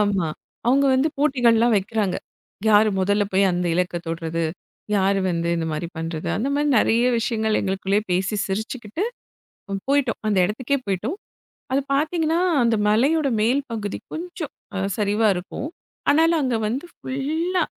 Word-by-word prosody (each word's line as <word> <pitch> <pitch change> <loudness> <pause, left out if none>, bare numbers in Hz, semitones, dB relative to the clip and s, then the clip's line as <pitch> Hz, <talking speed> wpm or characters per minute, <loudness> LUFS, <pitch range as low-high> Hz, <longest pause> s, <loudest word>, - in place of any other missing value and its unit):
ஆமா, 200 -4 +1 0.4
அவங்க 270 +3 +4
வந்து 265 +4 +3
போட்டிகள்லாம் 240 -5 +4
வைக்கிறாங்க. 200 -1 0 0.5
யாரு 215 0 +6
முதல்ல 205 +2 +2
போய் 190 0 +4
அந்த 175 0 -1
இலக்கை 180 0 0
தொடுறது, 165 0 -2 0.5
யாரு 195 0 +2
வந்து 170 -1 -1
இந்த 165 - -2
மாரி 155 +2 -3
பண்றது, 165 -1 -4
அந்த 235 +7 -1
மாரி 295 +1 +1
நிறைய 230 +3 +3
விஷயங்கள் 220 -2 0
எங்களுக்குள்ளேயே 195 +1 0
பேசி 190 +4 0
சிரிச்சுக்கிட்டு 220 - -3 0.9
போயிட்டோம். 275 -5 +2
அந்த 205 -2 +2
இடத்துக்கே 240 +8 -1
போயிட்டோம். 205 - -2 0.6
அதை 275 - +3
பாத்தீங்கன்னா, 320 +3 +1 0.2
அந்த 230 -1 +3
மலையோட 275 +9 +3
மேல் 245 +6 +2
பகுதி 210 -3 -3 0.2
கொஞ்சம் 340 -2 -5 0.2
அ - - -1 0.2
சரிவா 210 +1 +2
இருக்கும். 180 +10 -5 0.4
ஆனாலும், 325 +3 +4
அங்க 255 -4 0
வந்து 260 +9 -3
ஃபுல்லா 320 +7 -1
220 Hz, 140 wpm, -23 LUFS, 195-275 Hz, 0.9 s, யாரு